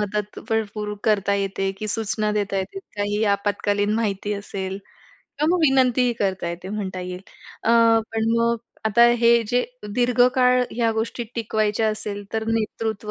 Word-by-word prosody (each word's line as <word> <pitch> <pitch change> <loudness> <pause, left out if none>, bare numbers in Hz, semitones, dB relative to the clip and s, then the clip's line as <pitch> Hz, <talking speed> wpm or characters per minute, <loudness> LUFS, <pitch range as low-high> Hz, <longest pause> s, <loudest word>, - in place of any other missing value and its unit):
मदत 210 0 -3
भरपूर 210 -1 -2
करता 200 -2 +2
येते, 195 -1 -1
की 215 - -4
सूचना 215 0 -1
देता 200 -2 -1
येते, 190 - -3 0.2
काही 205 +1 -1
आपत्कालीन 205 0 0
माहिती 210 -2 -1
असेल 195 -1 -5 0.6
किंवा 300 - +2
मग - - -1
विनंतीही 255 -4 +3
करता 190 -3 -1
येते 175 +2 -6
म्हणता 195 -3 -4
येईल. 180 0 -6 0.4
अ, 230 - +2 0.4
पण 225 0 0
मग 235 0 +2 0.3
आता 235 +3 +5 0.2
हे 235 0 +6 0.2
जे 245 0 +2 0.3
दीर्घकाळ 250 +1 +4
ह्या 230 -1 +1
गोष्टी 225 +2 -3
टिकवायच्या 220 -1 0
असेल, 210 -1 -4
तर 220 0 -1
नेतृत्व 220 -1 -2
215 Hz, 145 wpm, -23 LUFS, 200-230 Hz, 0.6 s, हे